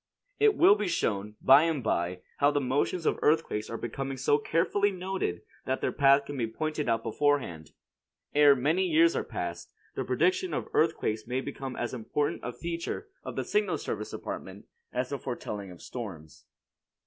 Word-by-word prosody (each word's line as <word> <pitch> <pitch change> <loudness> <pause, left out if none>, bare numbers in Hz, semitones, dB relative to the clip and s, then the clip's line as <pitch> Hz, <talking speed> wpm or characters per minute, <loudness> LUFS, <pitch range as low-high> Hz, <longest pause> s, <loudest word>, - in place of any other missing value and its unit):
It 435 -1 +5
will 200 - +7
be 210 -1 -1
shown, 105 - -1
by 135 +2 +8
and 160 -6 -1
by, 90 -3 -1 0.2
how 145 - +4
the 145 - +1
motions 145 +6 0
of - - +1
earthquakes 150 -9 +1
are 115 - -4
becoming 135 +4 -4
so 145 +3 +2
carefully 175 +7 +1
noted 185 - -3 0.2
that 130 0 0
their - - 0
path 140 0 +4
can 145 0 -6
be 115 - 0
pointed 150 +4 -2
out 115 0 +1
beforehand. 125 - 0 0.6
Ere 145 -1 +7
many 160 +9 +1
years 335 - +4
are - - 0
past, - - -5 0.2
the - - -2
prediction 370 0 +1
of - - -3
earthquakes 115 -9 +1
may 125 +1 -1
become 135 -1 -5
as 120 - -3
important 130 +5 -2
a 125 - -3
feature 170 - -5
of - - -6
the - - -2
Signal 420 +1 +1
Service - - -4
Department, - - -7 0.3
as - - -2
the 140 - -3
foretelling 105 -5 -5
of 90 -2 -12
storms. 95 -11 -8
140 Hz, 175 wpm, -29 LUFS, 115-165 Hz, 0.6 s, by